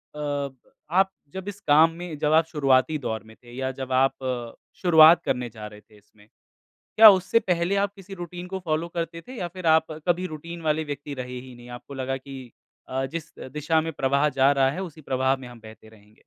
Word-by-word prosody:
अ, 145 -2 -2 0.5
आप 190 0 +3 0.2
जब 190 +1 -7
इस 205 - -19
काम 155 +3 +6
में 165 -4 -6
जब 150 +1 +1
आप 165 - -1
शुरुआती 135 +1 +3
दौर 110 -1 -3
में - - -16
थे 120 0 -17
या 130 0 -2
जब 130 0 -5
आप 135 -1 -1 0.5
शुरुआत 165 0 +7
करने 125 -2 -2
जा 105 - -6
रहे 105 0 -13
थे 105 - -22
इसमें, 105 +1 -24 0.7
क्या 220 -1 +11
उससे 230 +5 +2
पहले 175 +3 +1
आप 200 - -10
किसी 195 0 -11
रूटीन 175 +1 -8
को - - -3
फ़ॉलो 160 +1 -1
करते 165 0 -4
थे 260 - -9
या 175 - -2
फिर 180 -3 -4
आप 160 0 -3 0.2
कभी 175 +1 +1
रूटीन 170 +2 -9
वाले 155 +1 +1
व्यक्ति 145 +1 -6
रहे 125 0 -7
ही 125 -1 -12
नहीं, 120 0 -14
आपको 140 - -13
लगा 135 +1 -2
कि 135 -1 -7 0.5
अ, 130 +1 -2
जिस 165 -1 -6 0.2
दिशा 150 +2 +1
में 165 0 -4
प्रवाह 140 +3 +2
जा 135 +1 +4
रहा 135 0 +4
है 185 - -5
उसी 155 -1 -14
प्रवाह 130 +1 +1
में - - -8
हम 120 -1 -12
बहते 110 0 -14
रहेंगे? 105 -1 -21
145 Hz, 215 wpm, -25 LUFS, 130-170 Hz, 0.7 s, क्या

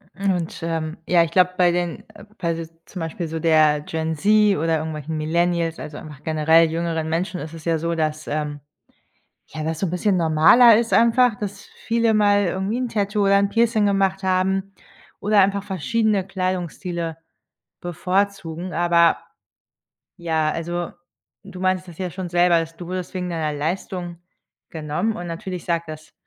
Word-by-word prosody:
Hm, 195 0 0
und, 170 -2 -4
ähm, 160 -1 -3
ja, 175 -2 +5
ich 165 - -4
glaube, 180 0 +4
bei 180 -1 +4
den, 175 -1 -2
äh - - -13
bei 170 -1 -1
d 165 0 -5 0.2
zum 185 - -9
Beispiel 165 +1 -4
so 160 +1 -4
der 155 -2 +4
Gen 160 +1 -3
Z 210 +4 +3
oder 160 +1 +1
irgendwelchen 155 0 -4
Millennials, 170 +1 0
also, 150 -1 -7
einfach 150 -2 -11
generell 160 +1 +4
jüngeren 165 -1 -2
Menschen 175 +3 -2
ist 155 0 -7
es 165 -1 -11
ja 165 -1 +1
so, 170 +1 -1
dass, 155 -1 -2
ähm, 150 -1 -3 0.9
ja, 155 - -6
das 160 0 -3
so - - 0
'n - - -3
bisschen 185 +1 +1
normaler 170 +9 +6
ist 230 - -2
einfach, 235 0 +4
dass 200 -1 -6 0.2
viele 230 -1 +2
mal 205 -1 +3
irgendwie 190 +6 -2
'n 250 - -1
Tattoo 205 -1 0
oder 200 0 +5
'n 200 0 +2
Piercing 225 -1 +2
gemacht 195 -1 +1
haben 190 +1 0 0.5
oder 210 0 +3
einfach 195 +1 +1
verschiedene 205 +2 0
Kleidungsstile 180 -3 -3 0.6
bevorzugen, 180 0 -2
aber, 170 0 +3 1.0
ja, 160 -3 0
also, 175 +1 -3 0.5
du 195 -2 -10
meinst 185 0 0
das 170 - -11
ja 185 -1 -3
schon 185 +1 -6
selber, 175 -1 +3
dass 165 0 -7
du 175 - -8
wurdest 185 0 -5
wegen 180 -1 -3
deiner 160 -2 -2
Leistung 175 +2 -4 0.5
genommen 160 +7 -2
und 175 - -6
natürlich 175 +1 -6
sagt 170 -1 -1
das 155 0 -10
175 Hz, 170 wpm, -22 LUFS, 160-195 Hz, 1.0 s, normaler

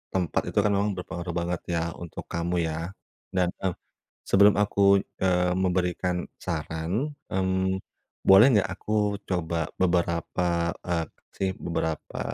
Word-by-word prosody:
tempat 90 -3 +1
itu - - -6
kan 105 - +2
memang 100 0 +1
berpengaruh 85 -1 -5
banget 85 0 -1
ya 85 0 -1
untuk 85 -2 -7
kamu 85 +1 -1
ya, 80 +3 -3 0.4
dan, 90 -1 +3
mmm, 95 -2 -1 0.5
sebelum 100 +1 +6
aku, 100 -1 +4 0.2
eee, 90 -1 +3
memberikan 90 -1 0 0.2
saran, 85 - -2 0.2
mmm, 95 0 0 0.5
boleh 95 +5 +9
nggak 95 - +1
aku 105 0 -1
coba 85 -3 -1
beberapa, 85 -1 +1
eee, 85 -3 -1 0.2
si - - -4 0.2
beberapa 80 -1 -3
90 Hz, 125 wpm, -26 LUFS, 85-95 Hz, 0.5 s, boleh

